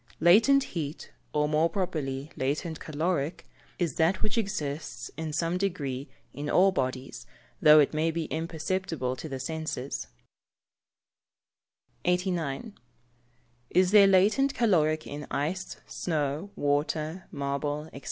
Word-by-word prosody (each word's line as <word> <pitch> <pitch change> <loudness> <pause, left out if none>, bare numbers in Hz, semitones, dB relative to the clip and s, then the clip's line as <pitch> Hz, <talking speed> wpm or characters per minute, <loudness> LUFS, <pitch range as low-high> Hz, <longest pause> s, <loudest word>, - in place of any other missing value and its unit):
_ - - -23
Latent 225 - +6
heat 155 - -5 0.2
(or 150 0 +1
more 155 +2 +2
properly 150 -7 -3
latent 150 +4 -2
caloric) 160 0 -2 0.3
is 170 -7 -1
that 165 +4 +2
which 215 -1 0
exists, 165 -9 -3
in 160 0 -4
some 165 +3 0
degree, 140 -9 -2 0.3
in 145 +3 -4
all 190 +2 +5
bodies, 130 -6 -3 0.3
though 155 0 +8
it 145 - +3
may 155 +2 +1
be 165 0 -2
imperceptible 160 -4 -2
to 155 - -7
the 135 -1 -4
senses. 155 -1 -4 2.0
89. 180 - -1 1.0
_Is 185 0 +5
there 205 -2 +8
latent 210 +9 +4
caloric 160 -9 +2
in 145 +1 -7
ice, 175 +7 -2
snow, 155 +2 -2
water, 155 +4 -1
marble, 145 +2 -2
&c? - - -7
160 Hz, 125 wpm, -28 LUFS, 145-180 Hz, 2.0 s, though